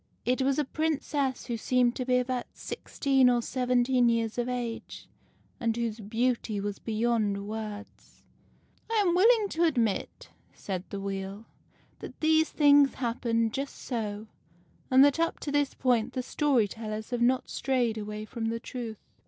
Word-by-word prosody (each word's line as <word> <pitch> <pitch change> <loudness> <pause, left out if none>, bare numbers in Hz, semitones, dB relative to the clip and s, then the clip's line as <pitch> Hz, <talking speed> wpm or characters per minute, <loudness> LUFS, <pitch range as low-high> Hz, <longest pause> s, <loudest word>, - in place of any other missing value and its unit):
It 255 +2 +1
was 270 +1 +2
a 300 - +1
Princess 290 -3 -1
who 235 -2 -3
seemed 245 +1 +2
to 255 - -2
be 250 0 +3
about 250 0 -1
sixteen 270 -3 +1
or 245 -1 +3
seventeen 250 0 +2
years 230 0 0
of 240 +1 -1
age, 240 -2 -5 0.5
and 230 -1 0
whose 230 -2 -2
beauty 225 0 -1
was 205 0 -4
beyond 215 -3 0
words. 215 -1 -8 0.3
" - - -37
I - - +1
am 350 - +3
willing 430 +3 +5
to 335 -1 0
admit," 240 - 0 0.2
said 190 -2 -5
the 200 - -5
Wheel, 195 +2 -5 0.3
" - - -35
that - - -10
these 315 0 +3
things 285 -2 +5
happened 230 -2 0
just 275 +1 -4
so, 215 -4 -4 0.6
and 265 +1 +7
that 285 +2 +2
up 330 0 0
to 290 - -3
this 290 -1 +1
point 250 -1 +1
the 255 - -2
story 265 -6 +2
tellers 215 +2 -6
have 245 -1 -1
not 250 +2 +2
strayed 250 -4 0
away 210 0 -5
from 225 +1 -5
the 230 +1 -1
truth. 230 -2 -6
240 Hz, 165 wpm, -28 LUFS, 220-265 Hz, 0.6 s, and